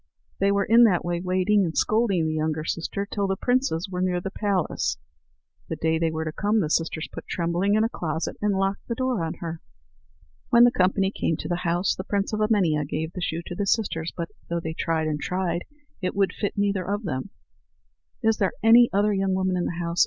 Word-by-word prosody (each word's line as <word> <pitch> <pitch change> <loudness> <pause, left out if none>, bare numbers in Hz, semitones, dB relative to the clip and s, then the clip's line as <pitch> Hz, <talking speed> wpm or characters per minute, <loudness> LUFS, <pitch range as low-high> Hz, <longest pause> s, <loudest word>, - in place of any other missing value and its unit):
They 200 0 +3
were 200 0 +1
that 225 -6 +5
way 175 0 -1
waiting, 185 +3 +2
and 165 -3 -3
scolding 215 -6 +2
the 155 - -1
younger 155 0 -1
sister, 175 +5 -2
till 200 -1 -2
the 195 - 0
princes 245 -6 0
were 180 -1 -4
near 180 -1 +1
the 190 +2 -5
place. 200 -5 -1 0.7
The - - -2
day 160 0 0
they 165 -1 +2
were 160 0 -3
to 155 - -2
come, 210 +6 +1
the 155 -6 -1
sisters 165 -1 0
put - - -8
Trembling 175 +4 0
in 215 - +3
a - - +3
closet, 160 -7 -3
and 205 -2 +1
locked 195 +1 -1
the 235 - -2
door 255 -7 0
on 160 - -3
her. 165 -1 -6 0.9
When 235 0 +7
the 245 - +7
company 190 -1 +2
came 165 -5 -1
to - - -5
the 175 - -1
house, 175 +1 +1
the 185 - -6
prince 200 +1 -1
of 215 - -1
Emania 190 -9 +2
gave 160 +3 -4
the 180 - -5
shoe 170 -1 -2
to - - -6
the 200 +3 -2
sisters. 170 -7 0
But 170 -1 -4 0.2
though 170 0 -1
they 160 -1 -4
tried 160 -1 -1
and 150 -1 -2
tried, 180 -1 -2 0.4
it 185 0 -2
would 195 -1 +2
fit 205 - -3
neither 200 -2 +1
of 205 +4 -2
them. 140 -1 -3 0.9
"Is 225 -1 +3
there 195 - +1
any 235 +1 +7
other 205 +2 +2
young 195 -1 +1
woman 185 -1 0
in 180 - 0
the 170 - -3
house?" 170 0 -2
185 Hz, 220 wpm, -25 LUFS, 165-205 Hz, 0.9 s, When